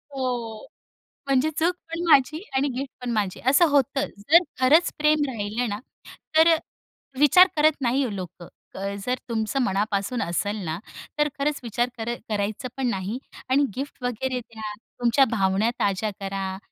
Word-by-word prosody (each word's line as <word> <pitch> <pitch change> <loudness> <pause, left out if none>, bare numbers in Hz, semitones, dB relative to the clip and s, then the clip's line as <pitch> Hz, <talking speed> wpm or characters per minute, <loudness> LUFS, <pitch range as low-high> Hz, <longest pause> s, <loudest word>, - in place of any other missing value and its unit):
हो, 240 -4 -3 0.6
म्हणजे 275 +2 +3
चूक 340 +3 +2 0.2
पण 335 +1 -3
माझी 305 +2 +4
आणि 270 +2 +2
गिफ्ट 275 0 -4
पण 245 - -2
माझी 205 -5 -1
असं 285 +6 +6
होतं. 280 0 +2
जर 310 - +5 0.2
खरंच 300 +7 +5
प्रेम 300 0 +3
राहिलं 225 0 -2
ना, 205 0 -3 0.6
तर 320 +1 +7
अ, - - +3 0.6
विचार 330 +6 +7
करत 305 -1 +3
नाही 250 -2 +1
लोकं, 180 -2 -8 0.6
जर 250 - +1
तुमचं 220 +2 -1
मनापासून 205 +2 -1
असेल 205 +5 -1
ना, 160 0 -2 0.4
तर 295 0 +3
खरंच 290 +1 0
विचार 240 +1 -1
कर 230 +1 -2 0.2
करायचं 210 +3 -2
पण 265 -2 0
नाही 195 +1 -3 0.3
आणि 275 +2 +4
गिफ्ट 275 -1 -6
वगैरे 250 +1 -2
द्या. 220 -3 -8 0.3
तुमच्या 245 +3 +4
भावना 195 0 +2
ताज्या 200 +2 0
करा. 195 -1 -3
245 Hz, 150 wpm, -25 LUFS, 210-280 Hz, 0.6 s, तर